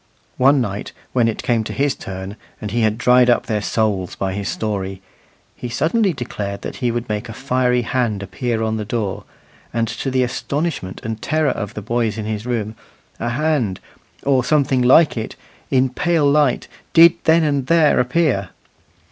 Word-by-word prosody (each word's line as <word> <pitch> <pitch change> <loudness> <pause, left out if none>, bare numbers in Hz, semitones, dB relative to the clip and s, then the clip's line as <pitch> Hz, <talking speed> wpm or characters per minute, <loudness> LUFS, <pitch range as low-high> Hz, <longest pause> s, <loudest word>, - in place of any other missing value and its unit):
One 135 +1 +5
night 100 -3 -4 0.2
when 120 -3 +3
it 115 - -3
came 115 -2 +1
to - - -5
his 140 0 +1
turn, 95 +1 -7 0.2
and 105 -2 -5
he 120 +2 0
had 110 -1 +2
dried 125 +1 +5
up 120 - +3
their 105 -2 -1
souls 105 -4 -1
by 95 -1 -2
his 100 0 -3
story, 95 -3 -3 0.6
he 125 - -6
suddenly 195 - +1
declared 105 -8 -5
that - - -6
he 125 -3 0
would 120 +1 -2
make 105 +2 -3
a - - -6
fiery 125 -1 +1
hand 115 -5 -1
appear 110 +4 -2
on 110 0 -1
the 110 - -3
door; 105 -2 -3 0.5
and 115 0 0
to 120 +4 -3
the 130 -1 +2
astonishment 135 - -3
and 110 -2 -4
terror 155 -1 +1
of 105 -1 -5
the 105 - -5
boys 115 -1 -1
in 110 - -4
his 110 +1 -4
room, 110 -3 -2 0.5
a 120 - -1
hand, 130 - 0 0.4
or 135 -2 +2
something 135 -1 +2
like 135 +4 +5
it, 110 - -4 0.3
in 130 0 +3
pale 160 +4 +1
light, 140 -2 +2 0.3
did 165 0 +8
then 160 +1 +5
and 140 -3 0
there 165 -2 +4
appear. 125 - +1
120 Hz, 180 wpm, -20 LUFS, 105-135 Hz, 0.6 s, did